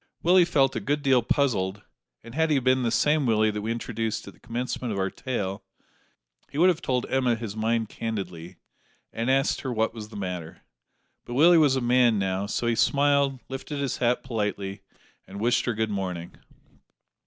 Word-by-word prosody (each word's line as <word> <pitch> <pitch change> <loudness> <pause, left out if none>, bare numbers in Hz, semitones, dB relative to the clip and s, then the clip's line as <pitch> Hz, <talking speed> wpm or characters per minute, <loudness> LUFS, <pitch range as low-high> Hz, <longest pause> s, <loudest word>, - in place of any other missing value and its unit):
Willie 180 +1 +6
felt 135 -5 +2
a - - 0
good 145 +7 -1
deal 130 -3 +4
puzzled, 105 -6 0 0.4
and 115 0 -11
had 160 +3 +1
he 150 - +3
been 130 0 +2
the 120 - +1
same 150 +4 +2
Willie 110 -1 +3
that 105 0 -4
we 110 +2 -2
introduced 115 -1 -3
at - - -9
the - - -24
commencement 125 0 -4
of 100 - -3
our 95 0 -1
tale, 100 -7 -4 0.9
he - - -8
would 180 +4 +6
have 170 -2 0
told 125 -6 -1
Emma 130 -3 +1
his 110 -3 -6
mind 115 +1 0
candidly, 95 -6 -5 0.6
and 115 +2 -2
asked 135 +1 +2
her 130 - -3
what 110 -1 0
was 110 -2 -8
the 110 - -12
matter; 90 -3 -6 0.6
but 120 - -7
Willie 165 +4 +6
was 145 -4 +4
a 130 - 0
man 120 -2 +4
now, 95 0 -1
so 115 - -2
he 120 - +2
smiled, 140 +1 +2
lifted 135 +2 -6
his 140 -2 -2
hat 125 0 +1
politely, 105 -5 -3 0.5
and 100 +1 -8
wished 120 +3 +2
her 120 - 0
good 110 0 -1
morning. 90 -4 -4
115 Hz, 190 wpm, -26 LUFS, 105-135 Hz, 0.9 s, Willie